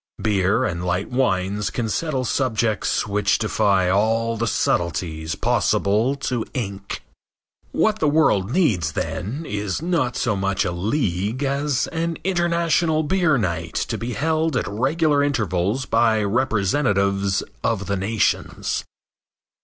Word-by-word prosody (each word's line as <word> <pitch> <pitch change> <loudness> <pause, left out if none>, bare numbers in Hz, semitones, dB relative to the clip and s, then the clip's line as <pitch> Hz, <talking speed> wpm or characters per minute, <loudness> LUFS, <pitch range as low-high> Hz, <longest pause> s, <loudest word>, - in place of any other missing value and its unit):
Beer 100 -2 +2
and 85 0 -3
light 90 +4 -1
wines 105 -5 0
can 120 +2 -2
settle 135 +1 -1
subjects 115 -4 0
which 105 -1 +1
defy 100 -4 +2
all 115 +4 +1
the 115 +1 -1
subtleties 80 -4 -1
possible 110 +7 +1
to 125 -4 -2
ink. 100 -5 -4 0.7
What 215 -1 +1
the 155 - +2
world 145 -11 +3
needs, 110 - +1
then, 125 - -3
is 105 -5 -3
not 155 -7 0
so 120 -6 0
much 95 0 0
a 90 - -1
league 105 - -1
as 140 -1 0
an 165 0 -2
international 170 -3 +1
beer 160 -2 +2
night 85 -6 -2
to - - -1
be 120 +1 -4
held 160 +1 0
at - - -1
regular 145 +8 +1
intervals 110 -3 0
by 115 -2 +2
representatives 100 -3 +1 0.2
of 100 -3 0
the 100 - -1
nations. 105 +3 -1
110 Hz, 130 wpm, -22 LUFS, 100-145 Hz, 0.7 s, world